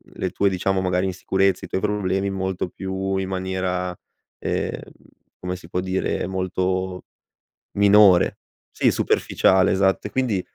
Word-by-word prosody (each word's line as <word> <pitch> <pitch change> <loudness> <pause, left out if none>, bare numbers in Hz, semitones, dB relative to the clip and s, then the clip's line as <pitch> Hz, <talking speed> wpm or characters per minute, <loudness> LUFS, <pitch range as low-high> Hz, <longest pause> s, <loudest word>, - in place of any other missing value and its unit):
le - - -2
tue, 100 - +2
diciamo, 95 +1 0
magari, 90 0 0
insicurezze, 95 +1 0
i - - -9
tuoi - - -1
problemi 100 -2 0
molto 95 -1 -2
più 95 +1 -3
in 95 0 -2
maniera 95 -1 -2 0.4
ehm, - - -2 0.6
come 90 0 -4
si 85 -2 -13
può 90 - -1
dire? 95 -1 -1
Molto 95 0 -2 0.7
minore. 100 -2 +5 0.3
Sì, - - +2
superficiale, 95 0 +2
esatto 95 +1 +1
e - - -9
quindi, 115 -6 0
95 Hz, 135 wpm, -22 LUFS, 90-95 Hz, 0.7 s, minore